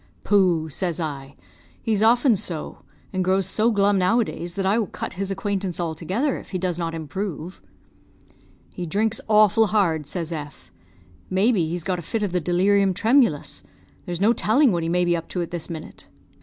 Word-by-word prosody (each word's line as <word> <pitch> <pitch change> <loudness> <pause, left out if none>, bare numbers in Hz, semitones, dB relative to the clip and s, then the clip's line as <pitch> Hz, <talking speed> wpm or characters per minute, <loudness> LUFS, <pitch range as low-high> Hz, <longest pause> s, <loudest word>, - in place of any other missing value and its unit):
"'Pooh!' 180 -6 +3
says 170 +2 -3
I; 140 -4 -5 0.4
'he's 215 -2 0
often 235 +2 +5
so, 175 -6 -5 0.3
and 185 -1 0
grows 190 +1 +2
so 220 +2 +2
glum 200 -2 +3
nowadays 180 -3 0
that 195 -1 -2
I 205 +4 +3
will 215 - -1
cut - - -6
his 195 +1 -4
acquaintance 195 -2 -2
altogether 175 - -1
if - - -14
he 185 - -3
does 180 -1 -2
not 165 -1 -2
improve.' 165 +2 -5 1.1
"'He 175 -1 -5
drinks 215 +6 0
awful 215 0 +5
hard,' 175 -8 +1
says 170 +1 -4
F; 145 - -7 0.6
'may 195 +6 +3
be 175 -9 +1
he's 175 0 -3
got 180 -1 -1
a - - -5
fit 210 +6 -3
of 200 - -1
the 180 0 0
delirium 190 +3 +2
tremulous. 230 - +2 0.5
There 175 - -3
is 170 - -3
no 215 +4 +4
telling 240 +4 +3
what 170 -2 0
he 165 - -2
may 180 +1 +2
be 175 0 +2
up 165 - -5
to 180 - -2
at 170 - -8
this 175 -1 -5
minute.' 160 -2 -9
185 Hz, 190 wpm, -23 LUFS, 170-205 Hz, 1.1 s, often